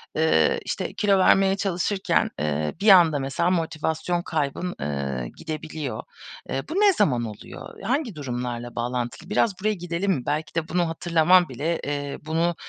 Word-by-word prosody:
eee, 155 - +3
işte, - - -3
kilo 200 -2 +2
vermeye 195 +1 +4
çalışırken, 195 +1 0
eee, 75 0 -1
bir 210 - +4
anda 165 -6 +7
mesela 135 +6 0
motivasyon 165 +1 -1
kaybın, 160 +3 -2
eee, 70 -4 -3
gidebiliyor. 155 -6 -5 0.5
Eee, 135 - -1
bu - - -4
ne 405 -1 +5
zaman 130 - +2
oluyor? 105 - -10
Hangi 240 - -1
durumlarla 120 -3 -4
bağlantılı? 120 +8 -3
Biraz 210 -2 +1
buraya 215 +2 +1
gidelim 180 +1 -2
mi? 130 -8 -1
Belki 155 +2 -2
de 165 -1 -1
bunu 175 -1 +1
hatırlaman 170 0 +3
bile, 150 +7 -2
eee, 145 -1 -3
bunu, 165 +2 0
160 Hz, 150 wpm, -24 LUFS, 130-180 Hz, 0.5 s, anda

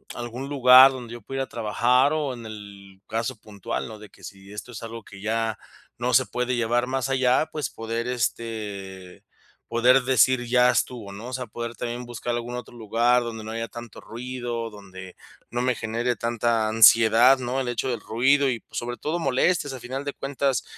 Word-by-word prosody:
algún 120 +3 -6
lugar 130 -1 +8
donde 125 -3 -8
yo 120 - -9
pueda 135 +6 -6
ir - - +1
a - - -9
trabajar, 120 +5 +2
o 150 -4 -1
en 120 -2 -9
el 100 -3 -11
caso 115 +3 -2
puntual, 100 0 -5
¿no?, 110 -1 -10
de 105 - -12
que - - -21
si 100 +1 -11
esto 105 +4 -8
es 110 - -8
algo 115 0 -7
que 95 - -13
ya 110 +1 -1 0.4
no 125 +1 -1
se 130 +2 +5
puede 125 +1 -2
llevar 120 +1 +1
más 130 0 -2
allá, 130 +3 +2
pues, 150 -6 -3
poder, 115 +1 -4
este, 105 -6 -4 0.4
poder 125 +3 +4
decir 130 -1 +3
ya 125 +1 +4
estuvo, 120 -4 -1
¿no?, 110 +5 -8
o - - -8
sea, 125 -2 -4
poder 120 +2 -6
también 120 +1 -5
buscar 120 0 -4
algún 120 +1 -4
otro 125 0 -8
lugar 120 +2 +2
donde 115 -2 -6
no 110 - -7
haya 115 0 -3
tanto 120 -2 -10
ruido, 120 -1 -5
donde 95 -3 -11 0.3
no 120 +1 -2
me 125 0 +2
genere 115 +2 -2
tanta 115 0 0
ansiedad, 115 +3 +6
¿no?, 125 +1 -2
el 130 - -2
hecho 120 +2 -2
del 120 -4 -3
ruido 135 +6 +2
y, 115 -2 -2
pues, - - -11
sobre 120 0 -4
todo, 155 +3 -2
molestias. 145 0 +1
A 130 - -7
final 130 +3 -5
de 145 - -3
cuentas, 135 -1 -1
120 Hz, 200 wpm, -24 LUFS, 110-125 Hz, 0.4 s, lugar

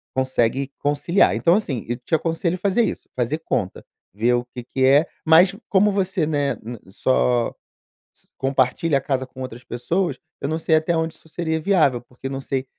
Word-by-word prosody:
consegue 130 +1 0
conciliar. 150 +6 +2
Então, 170 +1 +3
assim, 140 - -2
eu 120 - -1
te 125 +6 -10
aconselho 165 +2 -1
fazer 200 +5 +2
isso: 210 - -4
fazer 130 +5 -1
conta, 95 - -2 0.3
ver 115 +5 +2
o 120 0 -1
que 125 - -5
que 130 +2 0
é 140 +4 +5 0.2
mas 170 +4 +6
como 205 +1 +4
você, 190 -4 0
né, 145 -2 0
ne 120 +2 -6
só 125 +2 +2 0.6
s - - -20
compartilha 135 +3 +1
a - - -12
casa 130 -1 -1
com 130 0 -11
outras 125 -1 -7
pessoas, 165 +10 -2 0.2
eu 140 - -2
não 160 - 0
sei 160 0 +2
até 160 +2 0
onde 160 0 -1
isso 160 - -19
seria 160 -1 -2
viável, 155 -9 +3
porque 125 +2 -9
não 135 0 -4
sei 135 0 -2
140 Hz, 190 wpm, -22 LUFS, 125-165 Hz, 0.6 s, mas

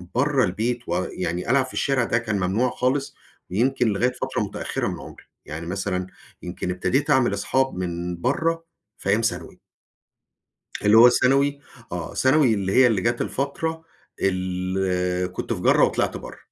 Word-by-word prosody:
برّه 135 0 +2
البيت 115 +7 -1
ويعني 90 +1 -2
ألعب 135 0 +3
في 130 - -11
الشارع 135 -3 +1
ده 115 - +1
كان 110 -3 -2
ممنوع 105 +8 +1
خالص، 135 +3 -1 0.4
ويمكن 125 +4 +1
لغاية 110 +5 +1
فترة 125 - -3
متأخرة - - -3
من - - -4
عمري - - -12 0.2
يعني 80 +2 -6
مثلًا 95 -1 -2 0.4
يمكن 90 +1 -4
ابتديت 130 +10 0
أعمل 130 -2 +3
اصحاب 135 0 0
من 85 -1 -4
برّه 165 +5 0 0.3
في 100 - -4
أيام 105 +3 +3
ثانوي. 115 - -3 1.3
اللي 105 +2 +6
هو 120 +2 +10
الثانوي، 140 +3 +3 0.3
آه 85 -1 -5
ثانوي 130 -2 +4
اللي 95 -2 -1
هي 130 -1 +6
اللي 105 -5 +1
جات 120 0 0
الفترة 160 +4 -3 0.4
ال 90 -1 -1
كنت - - -3
في - - -5
جرَّة - - +4
وطلعت - - +1
برّه. - - -10
115 Hz, 155 wpm, -23 LUFS, 90-130 Hz, 1.3 s, هو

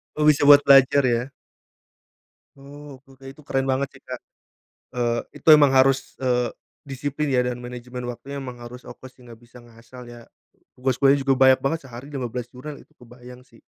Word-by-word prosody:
Oh 150 0 +1
bisa 150 -1 +4
buat 145 0 +8
belajar 135 0 +5
ya? 120 +3 -1 1.3
Oh 140 0 -13
oke 135 0 -21
oke, 135 0 -18
itu 140 - -18
keren 135 0 -1
banget 135 +1 -1
sih 135 - -17
Kak. 125 -1 -8 0.7
Eee, 120 -1 -1 0.2
itu - - -32
emang 145 -2 +4
harus, 135 0 +2
eee, 125 -2 -1 0.3
disiplin 145 +1 -4
ya 125 - +3
dan 125 -1 -3
manajemen 125 0 -8
waktunya 130 +3 -8
emang 125 -3 -8
harus 125 +1 -11
fokus 130 - -12
sih 125 - -19
nggak 115 -2 -14
bisa 120 +1 -18
ngasal 120 +1 -15
ya. 120 -1 -14 0.5
Tugas 130 0 -2
kuliahnya 140 +1 +4
juga 135 - +3
banyak 130 0 +4
banget, 160 +3 -1
sehari 125 +5 -11
15 125 -3 -5
jurnal 140 +3 -9
itu - - -20
kebayang 125 -1 -15
sih. 115 -2 -23
130 Hz, 185 wpm, -22 LUFS, 125-140 Hz, 1.3 s, buat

